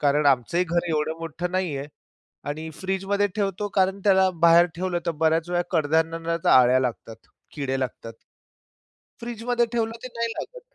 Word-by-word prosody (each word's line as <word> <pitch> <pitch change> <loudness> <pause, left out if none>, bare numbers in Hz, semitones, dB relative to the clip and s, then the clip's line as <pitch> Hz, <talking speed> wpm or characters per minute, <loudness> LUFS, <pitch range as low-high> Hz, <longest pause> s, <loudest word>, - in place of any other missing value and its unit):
कारण 145 0 +2
आमचंही 140 +6 +2
घर 170 0 -1
एवढं 160 0 -1
मोठं 165 +2 -4
नाहीये 160 -7 -2 0.6
आणि 155 +2 -4
फ्रीजमध्ये 195 +2 -1
ठेवतो 205 0 -1
कारण 190 0 +2
त्याला 190 -2 +5
बाहेर 170 +1 +7
ठेवलं, 180 0 -1
तर - - +2
बऱ्याच 160 +1 +1
वेळा 175 0 +1
कडधान्याला 165 +1 0
आळ्या 125 0 +6
लागतात, 115 -3 -4 0.4
किडे 135 -3 -2
लागतात. 115 -3 -5 1.1
फ्रीजमध्ये 240 +1 -1
ठेवलं, 225 -1 0
ते 255 - -6
नाही 230 0 -1
लागत - - -7
170 Hz, 145 wpm, -24 LUFS, 150-190 Hz, 1.1 s, बाहेर